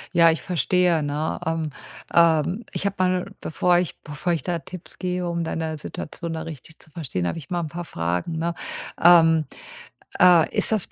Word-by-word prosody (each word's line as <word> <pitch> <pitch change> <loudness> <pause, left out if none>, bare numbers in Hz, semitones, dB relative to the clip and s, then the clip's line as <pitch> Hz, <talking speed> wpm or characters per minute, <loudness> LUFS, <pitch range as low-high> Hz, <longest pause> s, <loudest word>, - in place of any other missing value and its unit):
Ja, 165 -1 +7
ich 160 - -3
verstehe, 175 -1 +2
ne, 150 +2 -2
ähm, 160 -2 -1 0.4
ähm, 170 +5 +3
ich - - -4
hab 200 0 -1
mal 185 -1 +2
'n, 195 - -14
bevor 175 +2 +2
ich 180 - -4
bevor 150 +4 -3
ich 165 - -1
da 175 -2 -2
Tipps 185 +2 -10
gebe, 180 -1 -2
um 170 0 -1
deine 160 -1 -3
Situation 165 +2 -6
da 160 0 -4
richtig 160 0 -10
zu - - -10
verstehen, 130 - -3
hab - - -2
ich 155 -5 -9
mal 175 -1 -1
'n 165 - -3
paar 175 +3 -6
Fragen, 90 - -2
ne? 170 +1 -1 0.5
Ähm, 165 -2 +6 0.8
äh, 175 -3 +6
ist - - +3
das 215 -4 +1
165 Hz, 190 wpm, -23 LUFS, 155-175 Hz, 0.8 s, Ja